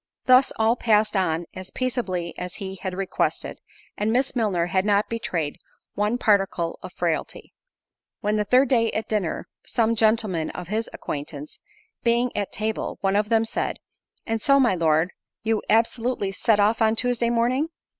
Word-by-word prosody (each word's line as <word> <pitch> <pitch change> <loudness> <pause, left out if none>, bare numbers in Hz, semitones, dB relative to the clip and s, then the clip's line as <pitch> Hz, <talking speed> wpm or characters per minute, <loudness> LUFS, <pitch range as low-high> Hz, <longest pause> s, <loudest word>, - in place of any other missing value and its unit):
Thus, 255 +1 +6
all 225 +1 +3
passed 215 -3 +2
on 175 -3 0
as 185 0 -8
peaceably 195 -10 -2
as 180 -1 -5
he 195 -2 -6
had 185 -2 -4
requested, 195 0 -2 0.4
and 210 +2 0
Miss 260 +3 +1
Milner 200 -8 +1
had 185 +1 +1
not 205 0 +2
betrayed 190 -10 -3 0.3
one 210 +3 0
particle 195 -7 +1
of 185 - -8
frailty; 170 -3 -3 0.7
when, 210 +1 0
the 210 - +1
third 250 +6 +4
day 230 -3 +3
at 220 - -2
dinner, 205 -7 -2 0.2
some 230 -1 +1
gentlemen 215 -7 +2
of 180 -1 -7
his 220 +2 -1
acquaintance 145 0 -6 0.4
being 235 +1 +1
at 205 -1 -2
table, 215 +1 -3
one 195 0 +1
of 210 +1 +1
them 225 -1 +3
said, 225 - -2 0.5
"And 225 -1 -2
so, 275 +3 +4
my 245 -6 +4
Lord, 165 0 +2 0.3
you 220 -1 +1
absolutely 225 -1 +1
set 210 +2 +2
off 215 +3 +3
on 220 0 +4
Tuesday 240 0 +1
morning?" 245 +6 +1
215 Hz, 165 wpm, -24 LUFS, 185-230 Hz, 0.7 s, Thus